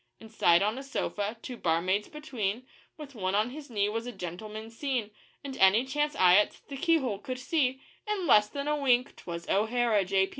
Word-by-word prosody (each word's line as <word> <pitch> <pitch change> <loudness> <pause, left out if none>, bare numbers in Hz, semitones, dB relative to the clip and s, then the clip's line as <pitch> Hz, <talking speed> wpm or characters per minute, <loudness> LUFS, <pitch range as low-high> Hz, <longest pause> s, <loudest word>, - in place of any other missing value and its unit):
Inside 215 -5 +3
on 215 +5 -1
a - - -6
sofa, 220 -5 -3
two 250 - -6
barmaids 185 +4 0
between, 255 -7 -4 0.3
With 295 -3 -10
one 190 -4 -2
on 215 +4 +1
his 290 +1 -9
knee 205 -3 +1
was 225 +3 -3
a - - -4
gentleman 215 +4 -7
seen; 240 -3 -2 0.3
And 275 -2 -6
any 195 +6 +5
chance 295 +2 -1
eye 180 0 +6
at 210 - +1
the 275 - -6
keyhole 270 - +1
could 255 -1 -5
see 265 -1 0 0.2
In 415 -4 -1
less 210 -7 +5
than 280 0 -5
a 300 - +2
wink 255 -4 +2
'twas 170 -1 -7
O'Hara, 220 0 +2
J. 190 +1 +1
230 Hz, 190 wpm, -29 LUFS, 200-270 Hz, 0.3 s, eye